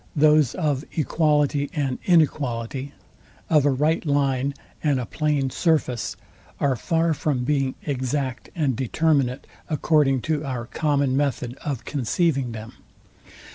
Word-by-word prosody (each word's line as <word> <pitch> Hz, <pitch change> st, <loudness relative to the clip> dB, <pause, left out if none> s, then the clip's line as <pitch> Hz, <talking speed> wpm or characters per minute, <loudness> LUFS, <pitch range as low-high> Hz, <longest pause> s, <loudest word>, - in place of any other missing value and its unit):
those 150 Hz, -3 st, +4 dB
of 150 Hz, -5 st, 0 dB
equality 150 Hz, -2 st, +1 dB
and 135 Hz, -4 st, -1 dB
inequality, 140 Hz, -6 st, +1 dB, 0.6 s
of 150 Hz, -3 st, +5 dB
a -, -, +5 dB
right 150 Hz, +5 st, +1 dB
line 140 Hz, -3 st, +1 dB, 0.3 s
and 145 Hz, -4 st, +2 dB
a 125 Hz, -, -3 dB
plain 145 Hz, 0 st, 0 dB
surface, 150 Hz, -9 st, 0 dB, 0.4 s
are 140 Hz, -2 st, +2 dB
far 165 Hz, +6 st, +1 dB
from 140 Hz, -3 st, -1 dB
being 135 Hz, -1 st, 0 dB
exact 130 Hz, -2 st, -2 dB
and 145 Hz, -7 st, +1 dB
determinate, 135 Hz, 0 st, +1 dB, 0.2 s
according 150 Hz, -3 st, +2 dB
to 150 Hz, +3 st, -1 dB
our 130 Hz, -4 st, -4 dB
common 140 Hz, -1 st, 0 dB
method 135 Hz, -3 st, -1 dB
of 135 Hz, -5 st, -3 dB
conceiving 140 Hz, -1 st, 0 dB
them. 110 Hz, 0 st, -8 dB
140 Hz, 125 wpm, -24 LUFS, 130-150 Hz, 0.6 s, of